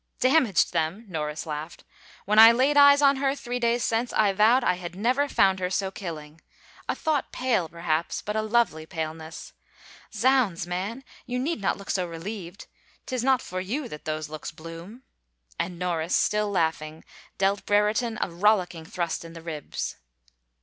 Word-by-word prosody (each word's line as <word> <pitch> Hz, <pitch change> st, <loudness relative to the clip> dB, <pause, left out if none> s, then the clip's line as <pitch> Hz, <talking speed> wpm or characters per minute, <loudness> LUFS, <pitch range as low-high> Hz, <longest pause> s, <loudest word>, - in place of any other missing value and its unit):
Damaged 255 Hz, -, +3 dB
them 160 Hz, +7 st, -1 dB
1 -, -, -19 dB
" -, -, -19 dB
Norris 150 Hz, -3 st, -4 dB
laughed. 155 Hz, +1 st, -6 dB, 0.2 s
" -, -, -23 dB
When 210 Hz, +2 st, +3 dB
I 225 Hz, +1 st, +11 dB
laid 260 Hz, +5 st, +2 dB
eyes 285 Hz, 0 st, +7 dB
on 280 Hz, -1 st, +5 dB
her, 275 Hz, 0 st, 0 dB
three 245 Hz, -3 st, -4 dB
days 235 Hz, 0 st, +1 dB
since, 235 Hz, +2 st, 0 dB
I 205 Hz, -2 st, +2 dB
vowed 225 Hz, +6 st, +4 dB
I -, -, +3 dB
had 175 Hz, -1 st, -7 dB
never 255 Hz, +8 st, +1 dB
found 190 Hz, -5 st, +3 dB
her 180 Hz, -1 st, -1 dB
so 190 Hz, 0 st, -1 dB
killing. 160 Hz, -5 st, -8 dB, 0.5 s
A -, -, +1 dB
thought 305 Hz, -3 st, -1 dB
pale, 235 Hz, -10 st, 0 dB
perhaps, 170 Hz, 0 st, -2 dB
but 210 Hz, -, -4 dB
a 220 Hz, -, +1 dB
lovely 215 Hz, -8 st, +1 dB
paleness. 160 Hz, -1 st, -6 dB, 0.6 s
Zounds, 225 Hz, -6 st, +2 dB
man, 195 Hz, +9 st, -4 dB, 0.2 s
you 250 Hz, -, -2 dB
need 275 Hz, 0 st, -2 dB
not 195 Hz, -, 0 dB
look 200 Hz, -, -5 dB
so 180 Hz, -2 st, -1 dB
relieved 175 Hz, +2 st, -7 dB, 0.2 s
— -, -, -33 dB
'tis 255 Hz, -2 st, -3 dB
not 260 Hz, -1 st, +3 dB
for 185 Hz, 0 st, -4 dB
you 245 Hz, +9 st, -3 dB
that 150 Hz, -, -9 dB
those 155 Hz, 0 st, -3 dB
looks 155 Hz, 0 st, -7 dB
bloom! 165 Hz, +9 st, -10 dB, 0.3 s
" -, -, -33 dB
and 175 Hz, -1 st, -3 dB
Norris, 170 Hz, -1 st, -1 dB
still 210 Hz, 0 st, +1 dB
laughing, 160 Hz, -4 st, -1 dB, 0.3 s
dealt 195 Hz, +1 st, 0 dB
Brereton 210 Hz, +3 st, +2 dB
a -, -, -4 dB
rollicking 180 Hz, -3 st, +1 dB
thrust 170 Hz, 0 st, -3 dB
in 165 Hz, 0 st, -11 dB
the 165 Hz, -, -10 dB
ribs. 155 Hz, -3 st, -5 dB
195 Hz, 185 wpm, -26 LUFS, 165-235 Hz, 0.6 s, I